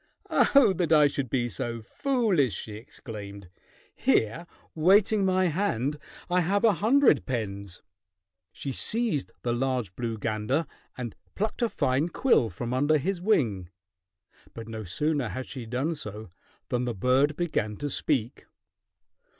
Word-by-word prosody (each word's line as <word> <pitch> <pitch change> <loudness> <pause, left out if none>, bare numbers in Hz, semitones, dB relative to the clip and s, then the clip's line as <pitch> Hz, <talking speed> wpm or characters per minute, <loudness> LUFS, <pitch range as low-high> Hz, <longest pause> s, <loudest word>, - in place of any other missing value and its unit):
"Oh, 275 -8 +5
that 170 -3 0
I 150 -2 +7
should 140 -3 -1
be 120 -1 0
so 115 +2 -3
foolish!" 200 - +1
she 110 - -6
exclaimed. 100 -3 -9 0.4
"Here 135 +11 +1 0.3
waiting 195 +5 +4
my 185 0 +2
hand 150 - -1 0.3
I 180 0 +2
have 200 +5 +1
a 225 -2 +6
hundred 235 - +3
pens." 100 -7 -4 0.7
She 140 - -5
seized 220 - -1
the 120 - 0
large 125 -6 -1
blue 115 -2 -3
gander 110 +8 -1 0.3
and 120 -4 -5 0.2
plucked 215 +4 -2
a 235 - +2
fine 135 -2 0
quill 175 - +3
from 120 +7 -4
under 145 +4 +3
his 175 +4 -2
wing, 115 - +1 0.9
but 115 -1 -7
no 110 -1 -6
sooner 140 - -1
had 130 +7 -5
she 125 -4 -7
done 130 +8 -1
so 110 - -7 0.4
than 125 0 0
the 120 -2 -3
bird 130 +8 +2
began 110 -12 -2
to 145 - -3
speak. 130 -7 -1
130 Hz, 140 wpm, -27 LUFS, 115-175 Hz, 0.9 s, I